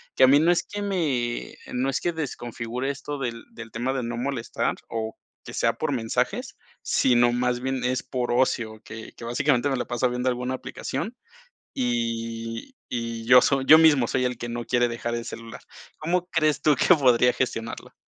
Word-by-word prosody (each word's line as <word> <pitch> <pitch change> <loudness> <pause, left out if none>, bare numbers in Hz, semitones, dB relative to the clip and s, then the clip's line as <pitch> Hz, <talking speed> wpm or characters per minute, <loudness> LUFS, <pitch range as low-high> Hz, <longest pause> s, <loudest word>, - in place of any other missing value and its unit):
que 130 - +4
a - - +9
mí, 140 +2 +6
no 170 +3 +4
es 175 - +2
que 205 0 -6
me 145 -12 -1 0.2
no 130 +2 0
es 135 - 0
que 175 - 0
desconfigure 125 -3 -4
esto 145 +1 -4
del 120 -3 -4
del 115 -1 -10
tema 125 +4 -2
de 130 -2 -2
no 120 0 -3
molestar, 125 -2 -2
o 110 -1 -4 0.3
que - - -9
sea - - +2
por - - -2
mensajes, 115 -2 -1 0.3
sino 120 -1 +3
más 125 0 0
bien 130 -1 -2
es 125 0 0
por 125 -2 -2
ocio, 115 -3 +1
que 110 0 -9
que 115 - -10
básicamente 130 +2 +1
me 135 - +1
la - - -2
paso 120 +1 0
viendo 125 +1 0
alguna 125 +1 -2
aplicación, 135 - -5 0.6
y 115 - -3
y 115 -1 -4
yo 125 +1 +8
soy 135 -1 +2
yo 155 - +10
mismo 145 -7 +5
soy 130 -1 0
el 125 -2 -2
que 120 - -5
no 120 0 -4
quiere 120 0 +2
dejar 120 0 -3
el 115 - -4
celular, 115 0 -8 0.4
¿cómo 180 +3 -1
crees 155 -4 +1
tú 150 -2 +4
que 175 +8 +5
podría 125 -3 +4
gestionarlo? 115 -3 -3
125 Hz, 195 wpm, -25 LUFS, 120-135 Hz, 0.6 s, yo